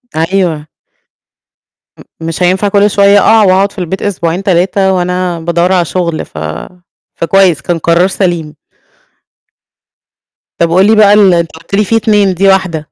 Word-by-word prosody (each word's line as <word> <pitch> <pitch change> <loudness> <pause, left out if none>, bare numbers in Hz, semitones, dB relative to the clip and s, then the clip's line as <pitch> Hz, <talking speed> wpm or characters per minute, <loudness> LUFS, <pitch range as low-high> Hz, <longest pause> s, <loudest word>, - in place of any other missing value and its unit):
أيوه. 165 -2 -1 1.3
أ - - -13 0.2
مش 165 +2 -4
هينفع 185 +3 +1
كل 205 +1 +2
شوية 200 0 +3
أقع 220 +1 +3
وأقعد 195 +1 +2
في - - -11
البيت 180 +1 -4
أسبوعين 180 -2 -3
3 190 +1 0
وأنا 180 -1 -2
بادوّر 170 +2 -1
على 175 -2 +1
شغل 170 -2 -3
ف - - -17 0.8
فكويس 175 -3 +1
كان 175 +2 -2
قرار 170 +3 +1
سليم. 175 -5 -3 2.0
طَب 170 - +1
وقُل 185 +4 +3
لي 220 - +3
بقى 205 -1 +5
ال 200 -3 +4
أنت 170 -2 -1
قُلت 165 +4 -7
لي 210 - +2
في 225 - -1
2 210 -3 +1
دي 195 +3 0
واحدة. 190 -5 0
185 Hz, 155 wpm, -10 LUFS, 170-195 Hz, 2.0 s, بقى